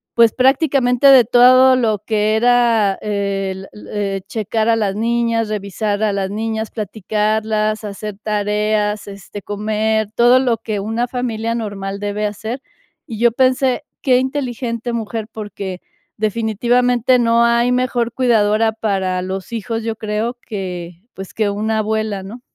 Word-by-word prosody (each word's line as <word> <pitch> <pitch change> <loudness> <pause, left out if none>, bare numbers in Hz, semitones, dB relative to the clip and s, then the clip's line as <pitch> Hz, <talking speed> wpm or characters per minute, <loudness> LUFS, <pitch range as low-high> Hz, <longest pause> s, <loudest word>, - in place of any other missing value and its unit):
pues, 230 -2 +5
prácticamente, 265 -1 +3
de 260 -4 +8
todo 255 +2 +6
lo 220 -5 +1
que 215 -1 +1
era 235 -4 +3
el, 195 -2 -3 0.2
eh, 195 -2 -2
checar 220 +1 -1
a 225 - +4
las 200 -3 -1
niñas, 230 0 0
revisar 205 0 -2
a 210 -2 +1
las 195 -1 -2
niñas, 220 0 -3
platicarlas, 215 +1 -1
hacer 210 0 -6
tareas, 210 0 0
este, 200 +1 -9
comer, 215 +1 -1
todo 240 +2 +5
lo 245 -3 +1
que 215 -2 -4
una 225 +4 -2
familia 230 -2 -2
normal 200 -3 -4
debe 205 +1 -2
hacer, 220 +5 -5 0.5
y 225 -3 -7
yo 235 -1 +4
pensé: 260 +1 +2 0.2
"Qué 255 -2 +3
inteligente 245 -3 -3
mujer", 225 -1 -4
porque 200 -4 -6 0.4
definitivamente 240 +3 +1
no 235 0 +3
hay 235 +1 +2
mejor 245 -2 0
cuidadora 220 -3 +2
para 190 -4 -1
los 190 +3 -5
hijos, 225 +1 -3
yo 225 -1 -2
creo 220 +3 -3
que, 180 -5 -5 0.2
pues, 195 -1 -9
que 215 -2 0
una 215 +2 -1
abuela, 215 -2 -2
¿no? 225 +6 -9
220 Hz, 140 wpm, -18 LUFS, 205-235 Hz, 0.5 s, de